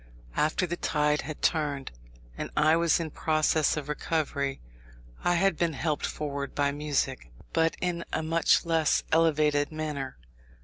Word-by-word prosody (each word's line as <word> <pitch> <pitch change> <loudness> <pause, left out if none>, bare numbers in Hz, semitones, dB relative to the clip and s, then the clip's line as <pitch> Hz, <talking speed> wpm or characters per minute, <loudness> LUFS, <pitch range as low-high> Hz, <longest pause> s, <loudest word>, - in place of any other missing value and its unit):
After 155 +5 +1
the 175 0 -3
tide 150 -2 +1
had 155 - -8
turned, 145 -4 0 0.4
and - - -5
I 155 +1 +5
was 170 -1 +3
in 160 -2 -4
process 155 0 +2
of 150 -2 -4
recovery, 145 -2 -1 0.6
I 175 - +3
had 195 -1 +2
been 170 -2 +1
helped 150 +1 -1
forward 140 -2 -4
by 140 -1 +2
music, 140 - -2 0.2
but 165 0 +2
in 175 -2 -1
a - - -1
much 165 +2 +3
less 165 -2 +2
elevated 150 -2 +3
manner. 150 - -4
155 Hz, 145 wpm, -28 LUFS, 145-165 Hz, 0.6 s, I